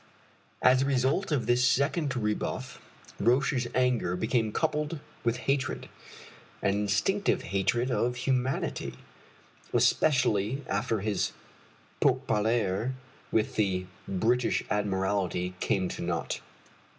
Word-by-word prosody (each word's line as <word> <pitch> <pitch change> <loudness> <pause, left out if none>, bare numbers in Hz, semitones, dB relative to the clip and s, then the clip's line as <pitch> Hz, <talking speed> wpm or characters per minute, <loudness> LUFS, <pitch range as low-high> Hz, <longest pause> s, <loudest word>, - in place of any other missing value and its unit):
As 130 0 +6
the 135 - +2
result 135 +7 +1
of 135 -7 +1
this 120 +2 +3
second 140 +2 +2
rebuff 105 -2 -2 0.4
Roch's 125 0 +2
anger 125 -8 +2
became 110 +3 0
coupled 150 +3 -1 0.2
with 115 +1 +1
hatred 135 -2 0 0.8
an 100 - +3
instinctive 105 - +1
hatred 100 +7 0
of 125 0 +1
humanity 130 +1 -1 0.8
especially 125 -3 +2
after 110 -3 -1
his 105 -2 -1 0.7
pourparlers 110 +1 +1 0.4
with 110 -1 0
the 95 -3 +1 0.2
British 115 +6 +1
Admiralty 95 -3 0
came 95 -2 +1
to - - -6
naught. 85 -3 -2
120 Hz, 100 wpm, -29 LUFS, 100-130 Hz, 0.8 s, As